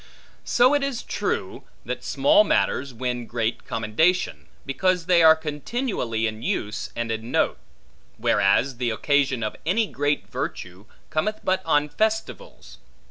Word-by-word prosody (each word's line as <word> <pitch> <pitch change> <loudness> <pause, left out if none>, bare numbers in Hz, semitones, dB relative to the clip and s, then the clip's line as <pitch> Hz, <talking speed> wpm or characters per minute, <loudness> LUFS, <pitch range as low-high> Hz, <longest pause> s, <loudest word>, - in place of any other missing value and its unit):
So 250 +3 +4
it 290 - +2
is 275 -3 -2
true, - - -3 0.2
that - - -4
small 305 +3 +4
matters 140 - 0
win 120 -1 -4
great 115 -1 -2
commendation, 115 +12 0 0.2
because 180 +5 0
they 175 -1 +4
are 160 -1 +8
continually 150 - -3
in 110 0 -3
use 105 -2 -3
and 115 -1 -2
in 110 +1 -4
note: - - +1 0.6
whereas 120 +7 +2
the 125 -1 -1
occasion 135 +1 +1
of 110 - -3
any 205 +8 +2
great 145 -5 -1
virtue, 90 +3 -6 0.3
cometh 210 +8 -1
but 185 0 0
on 150 -2 +3
festivals. 145 - -3
145 Hz, 135 wpm, -24 LUFS, 115-185 Hz, 0.6 s, are